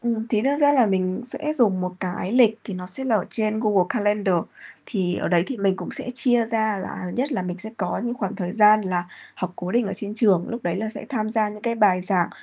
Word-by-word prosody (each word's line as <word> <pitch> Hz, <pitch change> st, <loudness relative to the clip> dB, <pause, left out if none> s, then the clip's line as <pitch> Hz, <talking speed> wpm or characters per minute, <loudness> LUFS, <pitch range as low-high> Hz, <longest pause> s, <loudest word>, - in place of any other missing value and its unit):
Ừm, 230 Hz, -2 st, -2 dB
thí 215 Hz, -2 st, +1 dB
nữa 280 Hz, +1 st, +2 dB
ra 290 Hz, 0 st, +5 dB
là 255 Hz, -5 st, +5 dB
mình 185 Hz, -1 st, 0 dB
sẽ 300 Hz, +4 st, -2 dB
dùng 220 Hz, -11 st, +3 dB
một 180 Hz, 0 st, -2 dB
cái 185 Hz, +2 st, -3 dB
lịch 235 Hz, -3 st, +5 dB
thì 200 Hz, -, -5 dB
nó 180 Hz, 0 st, -6 dB
sẽ 205 Hz, +9 st, -2 dB
là 235 Hz, -4 st, +3 dB
ở 190 Hz, -, -1 dB
trên 215 Hz, -1 st, 0 dB
Google 205 Hz, -5 st, +3 dB
Calendar, 205 Hz, -3 st, +1 dB, 0.5 s
thì 185 Hz, -5 st, -1 dB
ở -, -, -2 dB
đấy 170 Hz, -1 st, +3 dB
thì 265 Hz, -, -4 dB
mình 195 Hz, -3 st, +1 dB
cũng -, -, -6 dB
sẽ -, -, -4 dB
chia 245 Hz, -2 st, +2 dB
ra. 220 Hz, -2 st, 0 dB
Là 180 Hz, -1 st, -6 dB
nhất 275 Hz, +4 st, 0 dB
là 195 Hz, -, -1 dB
mình 180 Hz, 0 st, -5 dB
sẽ 220 Hz, +4 st, -4 dB
có 180 Hz, -5 st, -2 dB
những 240 Hz, 0 st, -2 dB
khoảng 200 Hz, -6 st, -4 dB
thời 180 Hz, -2 st, -3 dB
gian 215 Hz, -1 st, +6 dB
là 180 Hz, -3 st, -2 dB, 0.3 s
học 180 Hz, -1 st, -4 dB
cố 180 Hz, 0 st, -5 dB
định 235 Hz, -2 st, +2 dB
ở 195 Hz, -, -3 dB
trên 205 Hz, +2 st, -5 dB
trường, 200 Hz, -6 st, +3 dB
lúc 235 Hz, 0 st, -5 dB
đấy 175 Hz, -, -1 dB
là 220 Hz, +3 st, -2 dB
sẽ -, -, -7 dB
tham 220 Hz, -6 st, -2 dB
gia 220 Hz, -1 st, +1 dB
những 210 Hz, 0 st, -10 dB
cái 235 Hz, 0 st, 0 dB
bài 205 Hz, -5 st, +4 dB
giảng 185 Hz, -3 st, +1 dB
210 Hz, 265 wpm, -23 LUFS, 185-230 Hz, 0.5 s, gian